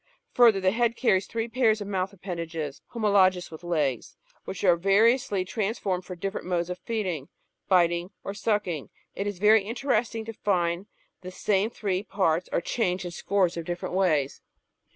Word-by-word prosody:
Further, 230 -5 +5
the 185 0 +2
head 230 +1 +1
carries 195 -7 +2
three 225 0 -3
pairs 230 -2 +2
of 205 - -5
mouth 190 -1 -1
appendages 170 -6 -5
(homologous 195 -6 +2
with 160 +2 -10
legs), 150 -8 -1 0.3
which 190 - -6
are 180 -3 +6
variously 200 +2 +3
transformed 195 -3 -2
for 180 - -7
different 195 +2 -4
modes 175 -1 -1
of 180 - -5
feeding, 185 - -3 0.4
biting, 175 -1 +3
or 195 - -4
sucking. 200 - -1 0.2
It 200 - -3
is 205 -2 -3
very 210 +3 +5
interesting 230 0 -1
to 225 - -6
find 180 -2 0
that 185 - -18
the - - -5
same 200 +2 +1
three 195 -5 -2
parts 185 -4 0
are - - +1
changed 180 -2 -1
in 175 - -4
scores 185 -1 0
of 165 - -4
different 175 +1 -4
ways. 155 -8 +1
190 Hz, 170 wpm, -27 LUFS, 175-215 Hz, 0.4 s, are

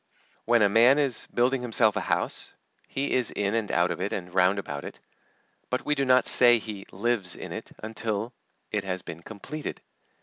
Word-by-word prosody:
When 115 -1 +4
a - - +6
man 115 +7 +5
is 140 -5 +1
building 125 +2 +1
himself 115 -3 +2
a - - -1
house, - - -1 0.3
he 140 +1 -2
is 125 -3 +2
in 100 0 -1
and 115 -2 -1
out 85 +1 +2
of - - -4
it 100 - -2
and 90 -2 -5
round 95 +1 +3
about 70 -7 -5
it. - - -9 0.7
But 125 - -2
we 150 - +2
do 140 -2 0
not 130 0 +4
say 120 -1 +6
he 105 -3 -8
lives 100 -3 -1
in - - -8
it - - -7
until 110 +1 -3 0.4
it 105 -2 -1
has 95 -2 -4
been 85 -1 -8
completed. 110 - -7
110 Hz, 195 wpm, -27 LUFS, 100-125 Hz, 0.7 s, a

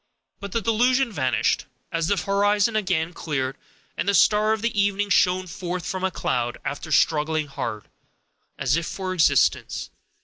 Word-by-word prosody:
But 200 -1 -7
the 230 - -1
delusion 245 +3 +2
vanished, 130 - 0 0.3
as 165 -1 -1
the 200 - +1
horizon 205 +3 +2
again 180 -5 0
cleared, 135 -6 -3 0.4
and 195 - -1
the 200 - +3
star 215 +2 +4
of 220 +1 -1
evening 205 -2 0
shone 185 +1 +3
forth 180 0 -5
from 185 0 -4
a 190 - +2
cloud, 120 -8 -2
after 145 +3 -5
struggling 155 0 +2
hard, 110 -7 -5 0.7
as 130 +2 +1
if 165 0 -2
for 185 -1 -4
existence. 170 -4 +2
185 Hz, 150 wpm, -24 LUFS, 155-205 Hz, 0.7 s, star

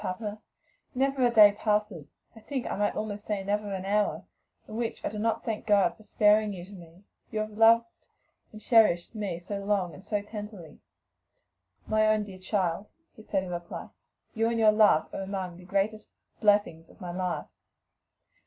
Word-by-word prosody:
papa, 210 +2 -5 0.5
never 270 0 +1
a 245 - +5
day 215 -3 +8
passes, 210 -8 -1 0.3
I - - -12
think 260 +3 -4
I - - -3
might 205 +1 0
almost 210 -1 -4
say 205 -2 -2
never 205 +1 -2
an 190 -1 -4
hour, 205 +1 0 0.4
in 215 - -8
which 230 0 -3
I - - 0
do 210 - -6
not 225 +1 -1
thank 220 -2 -4
God 200 -5 +3
for - - -19
sparing 210 0 +3
you 175 -2 -8
to 195 - -16
me; 175 -1 -14 0.3
you 215 - -2
who - - -1
have 210 - -14
loved 230 +1 +6 0.7
and 215 - -11
cherished 215 -7 +3
me 205 -6 -3
so 200 +4 -5
long 195 -4 0
and 185 - -13
so 205 -1 -2
tenderly." 210 -6 -9 1.1
"My 215 0 +2
own 215 -1 +2
dear 195 -2 -10
child!" 190 0 -1 0.3
he - - -13
said 195 -3 -1
in 180 - -7
reply, 175 0 -6 0.4
"you 225 0 +1
and 230 - -1
your 220 -1 +6
love 210 -7 +4
are - - -4
among 190 -3 -5
the 180 - -14
greatest 200 +3 -1 0.3
blessings 205 -6 +2
of - - -19
my 180 -1 -6
life." 180 0 -3
205 Hz, 190 wpm, -28 LUFS, 185-215 Hz, 1.1 s, day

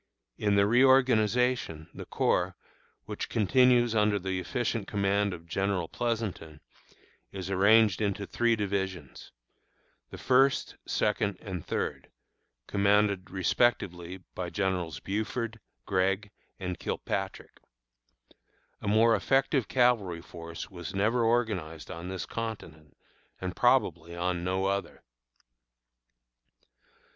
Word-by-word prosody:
In 105 -1 +2
the 100 0 +5
reorganization, 125 - +3
the - - -9
corps, - - 0 0.5
which - - -5
continues 120 +2 +4
under 105 -1 +3
the 95 -1 -2
efficient 115 +2 -2
command 100 0 +1
of 85 -2 -8
General 95 0 -1
Pleasonton, 110 -10 -3 0.7
is 95 -1 -6
arranged 105 +1 +4
into 100 -1 -1
three 120 +3 +1
divisions, 95 - -4 0.8
the - - -9
First, 135 +1 +2
Second, 100 -2 0
and 90 -5 -6
Third, - - -3 0.6
commanded 100 -1 +2
respectively 95 -3 0
by 90 -1 -4
Generals 90 -7 -2
Buford, 110 +3 -3 0.3
Gregg, 95 +2 0 0.3
and 90 -2 -4
Kilpatrick. - - -4 1.2
A - - -5
more 110 +2 +5
effective 135 +1 +1
cavalry 115 -9 +2
force 85 +1 -9
was 90 +1 -7
never 110 +5 +2
organized 105 -10 -1
on 85 0 -7
this 95 0 -4
continent, 85 -10 -7 0.4
and 90 -2 -4
probably 85 -10 +2
on 90 0 -1
no 95 +1 0
other. 100 0 -2
100 Hz, 105 wpm, -29 LUFS, 90-115 Hz, 1.2 s, the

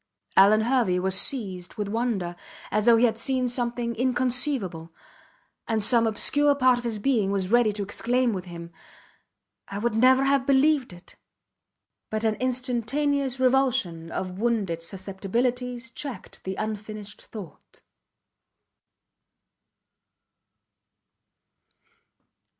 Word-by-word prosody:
Alvan 205 +3 +6
Hervey 230 -6 +1
was 190 +1 0
seized 190 -4 -2
with 210 -1 -3
wonder, 205 -5 -2 0.4
as 210 0 +1
though 235 -1 +6
he 240 - +4
had 225 -1 0
seen 255 0 0
something 240 -1 -2
inconceivable; 245 - 0 0.8
and 220 -2 0
some 230 +1 +4
obscure 285 +6 +2
part 255 -3 +3
of - - -9
his 230 -3 -2
being 215 -3 +1
was 195 -1 -1
ready 240 -2 +4
to 205 0 -4
exclaim 240 +4 0
with 185 -2 -5
him: 170 -1 -9 1.0
I 200 - -6
would 235 +3 -1
never 260 +4 +5
have 275 -1 +1
believed 275 -2 +3
it! 175 0 -15 0.9
but 215 0 -3
an 220 -1 +2
instantaneous 255 +2 -1
revulsion 245 -11 +1
of 185 0 -4
wounded 210 -8 -1
susceptibilities 230 +7 -3
checked 260 -6 -8
the 190 0 -3
unfinished 215 0 -6
thought. 200 -8 -12
230 Hz, 115 wpm, -25 LUFS, 195-255 Hz, 1.0 s, Alvan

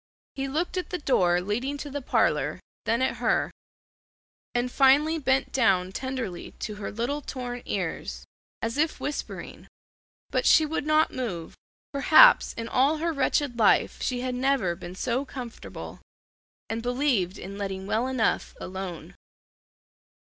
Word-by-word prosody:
He 275 0 -3
looked 320 +7 -2
at 365 - -3
the 360 - -2
door 180 - +2
leading 240 +9 -2
to 290 0 -7
the 285 +1 -3
parlor, - - +1 0.3
then 235 +3 +1
at - - 0
her; - - +1 1.0
and 245 +1 0
finally 290 +5 +4
bent 265 -2 +1
down 185 -7 +3
tenderly 255 -6 -5
to 215 - -3
her 205 - -5
little 245 +7 -2
torn 245 -3 -5
ears, 185 -5 -3 0.4
as 230 +5 -2
if 315 +1 +1
whispering, 290 - -5 0.6
but - - +1
she 315 - +6
would 305 -1 -3
not 310 +1 +3
move. 190 -11 -4 0.4
Perhaps 315 - +7
in 230 0 -5
all 275 +6 +3
her 330 +1 -1
wretched 270 -2 0
life 215 - +3
she 250 -1 -1
had 255 0 -2
never 250 -8 +1
been 175 0 -9
so 245 +7 -1
comfortable, 250 -4 -8 0.7
and 225 +1 -3
believed 245 -7 0
in 200 +2 -8
letting 190 -1 -4
well 225 +5 0
enough 255 -4 0
alone. 185 -2 -6
250 Hz, 145 wpm, -27 LUFS, 205-280 Hz, 1.0 s, Perhaps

